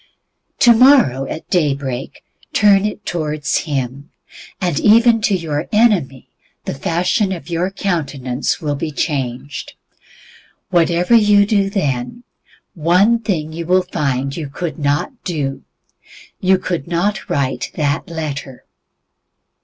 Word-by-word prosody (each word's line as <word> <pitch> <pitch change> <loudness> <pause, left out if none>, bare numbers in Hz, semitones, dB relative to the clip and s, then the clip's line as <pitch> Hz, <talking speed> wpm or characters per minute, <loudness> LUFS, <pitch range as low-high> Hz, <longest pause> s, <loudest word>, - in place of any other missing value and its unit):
Tomorrow 235 - +5
at 160 - -7
day 150 -6 +2
break, 135 -2 -6 0.3
turn 205 -1 +4
it 210 -1 -7
towards 155 -3 -2
Him, 140 -2 -4 0.5
and 175 -6 0
even 225 +1 +5
to 210 -2 +2
your 155 -3 -3
enemy 195 - +2 0.4
the - - -3
fashion 180 +7 0
of 175 -1 -6
your 170 +2 0
countenance 145 -9 -2
will 150 -2 -2
be 150 +3 -3
changed. 140 -3 -4 1.0
Whatever 175 +3 +2
you 205 -3 +5
then 195 - 0
do, 240 - -15 0.5
one 180 +8 +3
thing 165 -8 -3
you 165 0 -6
will 185 +1 +3
find 140 -6 -2
you 155 -4 -5
could 155 +1 -5
not 145 - -1
do 145 -6 -3 0.8
you 190 0 +3
could 175 -6 -4
not 180 +4 -1
write 135 -2 -1
that 145 +1 -1
letter. 145 -5 -6
165 Hz, 120 wpm, -18 LUFS, 140-195 Hz, 1.0 s, Tomorrow